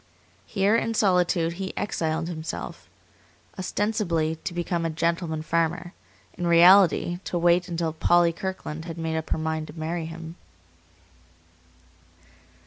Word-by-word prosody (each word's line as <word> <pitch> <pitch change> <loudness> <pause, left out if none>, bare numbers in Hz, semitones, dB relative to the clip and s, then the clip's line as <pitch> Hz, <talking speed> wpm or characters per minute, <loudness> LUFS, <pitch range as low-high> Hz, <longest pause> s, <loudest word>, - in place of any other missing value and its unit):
Here, 200 +1 +2
in 230 0 0
solitude, 180 -4 +2
he 190 - -5
exiled 160 -4 -1
himself; 160 -2 -6 0.7
ostensibly 180 -5 -1
to 180 - -5
become 175 0 -2
a 165 - 0
gentleman 160 0 -1
farmer; 170 +2 -1 0.4
in 175 -1 -2
reality 175 0 +6
to 175 - -2
wait 175 +1 +3
until 165 -2 -2
Polly 170 +1 +3
Kirkland 165 -4 -5
had 165 -1 -7
made 160 -1 -2
up 160 -1 -3
her - - 0
mind 160 0 -2
to 150 - -10
marry 165 +1 -3
him. 165 0 -9
170 Hz, 130 wpm, -25 LUFS, 160-180 Hz, 0.7 s, reality